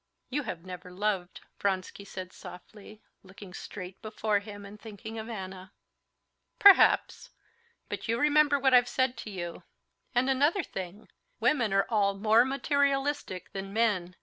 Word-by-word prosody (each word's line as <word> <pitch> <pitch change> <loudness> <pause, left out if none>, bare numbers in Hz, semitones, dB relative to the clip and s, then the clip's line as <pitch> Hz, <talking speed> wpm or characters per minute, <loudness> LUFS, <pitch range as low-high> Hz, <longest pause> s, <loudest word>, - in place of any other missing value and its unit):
"You 290 +3 0
have 170 - -6
never 180 0 -8
loved," 190 -1 -2 0.2
Vronsky 195 0 -2
said 185 -2 -8
softly, 210 +4 -12 0.2
looking 190 -1 -13
straight 185 -1 -8
before 215 -1 0
him 205 0 -10
and 205 +1 -12
thinking 220 +1 -8
of 220 +1 -7
Anna. 190 -3 -7 0.8
"Perhaps. 400 -1 +6 0.6
But - - -5
you 230 0 +1
remember 295 +1 +4
what 265 -1 +2
I've 245 0 +6
said 260 -1 +1
to - - -7
you. 175 -4 -6 0.5
And 245 +2 +3
another 290 +8 +2
thing, 190 0 -7 0.3
women 240 -9 +2
are 195 0 +3
all 200 -3 +1
more 220 +3 +4
materialistic 275 - 0
than 195 0 -6
men. 200 -6 +1
210 Hz, 145 wpm, -29 LUFS, 190-255 Hz, 0.8 s, Perhaps